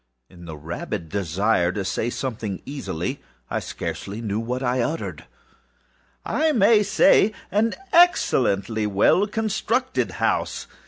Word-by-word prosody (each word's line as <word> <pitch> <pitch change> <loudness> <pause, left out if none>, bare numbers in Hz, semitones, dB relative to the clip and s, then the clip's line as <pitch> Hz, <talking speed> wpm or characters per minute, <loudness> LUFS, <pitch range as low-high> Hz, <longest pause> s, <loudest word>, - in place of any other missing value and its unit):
â - - -20
(In 85 -1 -13
the 80 -2 -8
rabid 80 +3 -5
desire 95 0 +1
to 100 -1 -3
say 110 +5 -1
something 115 -6 -4
easily, 135 - -4 0.3
I - - 0
scarcely 100 +3 -5
knew 105 -2 -2
what 125 +3 -3
I 125 0 +1
uttered 155 +7 -3
at - - -22 1.1
all.)ââI 315 -1 +2
may 210 +1 +5
say 205 +1 +4 0.2
an 215 +4 +1 0.2
excellently 115 - +3
well 105 - +3
constructed 225 +4 -1
house. - - -1
115 Hz, 130 wpm, -23 LUFS, -, 1.1 s, may